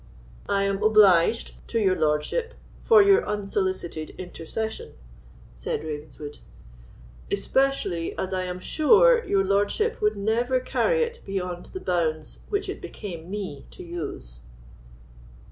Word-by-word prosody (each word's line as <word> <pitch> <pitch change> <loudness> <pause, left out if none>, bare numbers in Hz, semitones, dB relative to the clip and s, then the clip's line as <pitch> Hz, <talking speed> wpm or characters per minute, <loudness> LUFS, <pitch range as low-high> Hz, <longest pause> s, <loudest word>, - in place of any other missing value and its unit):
"I 200 -1 +2
am 200 0 -1
obliged 215 -1 +4
to 230 - -1
your 190 -3 +3
lordship 155 - 0 0.3
for 440 -3 +6
your 400 0 +5
unsolicited 190 -6 -2
intercession," 185 +5 -5 0.6
said - - -4
Ravenswood; 150 -1 -7 0.9
"especially 200 -6 0
as 190 0 -3
I 185 0 -1
am 180 0 -5
sure 455 - +4
your 195 - +1
lordship 205 - +1
would 210 0 +1
never 235 +5 +1
carry 480 - +1
it 470 0 -5
beyond 180 -2 -4
the 375 - -7
bounds 160 - -1
which 405 0 -1
it - - -5
became 175 -5 -8
me 190 -9 -6
to - - -11
use." 165 - -7
195 Hz, 125 wpm, -25 LUFS, 170-235 Hz, 0.9 s, for